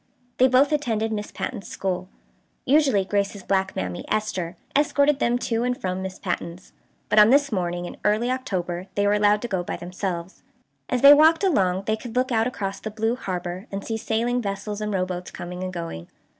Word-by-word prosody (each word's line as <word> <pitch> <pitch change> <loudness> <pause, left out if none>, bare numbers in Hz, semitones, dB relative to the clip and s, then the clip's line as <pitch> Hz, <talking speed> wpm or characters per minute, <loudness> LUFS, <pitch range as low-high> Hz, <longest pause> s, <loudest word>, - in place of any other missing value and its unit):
They 255 - +7
both 265 +3 +4
attended 225 -7 0
Miss 210 -1 -4
Patten's 220 -7 -5
school. 185 -1 -3 0.6
Usually 270 -8 +3
Grace's 200 0 -1
black 190 0 0
mammy, 90 -1 -3
Esther, 185 -5 -2 0.2
escorted 290 0 +3
them 240 -1 +2
to 230 -1 -1
and 250 0 -1
from 185 0 -2
Miss 190 0 -5
Patten's, 175 -1 -5 0.3
but 215 - +4
on 210 +1 +8
this 280 +1 +4
morning 175 -3 -2
in - - -8
early 215 +4 +2
October 185 -8 -3
they 205 - +2
were 205 - +3
allowed 210 +1 +3
to - - -1
go 190 -5 -1
by 175 - -4
themselves. 180 0 -5 0.5
As 250 0 -1
they 280 +1 +11
walked 320 +4 +5
along 190 - +2
they 215 - +1
could 230 +1 -9
look 255 +1 +1
out 225 0 +2
across 200 -5 -4
the 215 - -5
blue 220 +2 -1
harbor, 185 -2 -5
and 195 0 -5
see 225 - -2
sailing 230 +3 0
vessels 205 0 -4
and 210 0 -2
rowboats 185 -2 -2
coming 180 +1 -7
and 185 - -3
going. 165 - -6
205 Hz, 195 wpm, -24 LUFS, 185-245 Hz, 0.6 s, they